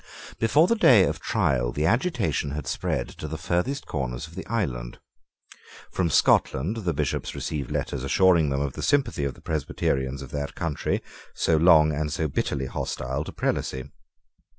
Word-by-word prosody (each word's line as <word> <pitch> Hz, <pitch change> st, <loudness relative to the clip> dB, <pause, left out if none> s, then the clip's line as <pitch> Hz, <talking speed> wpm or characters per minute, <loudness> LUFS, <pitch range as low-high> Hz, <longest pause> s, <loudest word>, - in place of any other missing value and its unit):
Before 145 Hz, +8 st, +4 dB
the 230 Hz, -, +2 dB
day 130 Hz, -, +6 dB
of -, -, -1 dB
trial -, -, 0 dB
the 75 Hz, +5 st, -1 dB
agitation 105 Hz, -, +1 dB
had 75 Hz, -2 st, -4 dB
spread -, -, -2 dB
to 75 Hz, -, -8 dB
the 80 Hz, +1 st, -5 dB
farthest 90 Hz, -, -1 dB
corners 60 Hz, 0 st, -3 dB
of 80 Hz, -, -14 dB
the -, -, -7 dB
island. 65 Hz, -, -2 dB, 0.9 s
From 90 Hz, -3 st, 0 dB
Scotland 80 Hz, +6 st, +2 dB
the 90 Hz, -7 st, -1 dB
Bishops -, -, -2 dB
received 75 Hz, -4 st, -4 dB
letters 70 Hz, -2 st, -3 dB
assuring 85 Hz, +2 st, +4 dB
them 70 Hz, 0 st, -1 dB
of 70 Hz, -2 st, -2 dB
the -, -, -6 dB
sympathy 140 Hz, -, +1 dB
of 70 Hz, -, -3 dB
the -, -, -17 dB
Presbyterians 70 Hz, -3 st, -2 dB
of 65 Hz, -, -10 dB
that 70 Hz, -1 st, -4 dB
country, 80 Hz, -3 st, -2 dB, 0.3 s
so 80 Hz, -, +2 dB
long 80 Hz, -1 st, +6 dB
and 75 Hz, +1 st, -2 dB
so 80 Hz, +1 st, -1 dB
bitterly 65 Hz, -1 st, -2 dB
hostile 65 Hz, +1 st, -3 dB
to -, -, -7 dB
prelacy. 65 Hz, +2 st, -2 dB
75 Hz, 170 wpm, -25 LUFS, 70-90 Hz, 0.9 s, day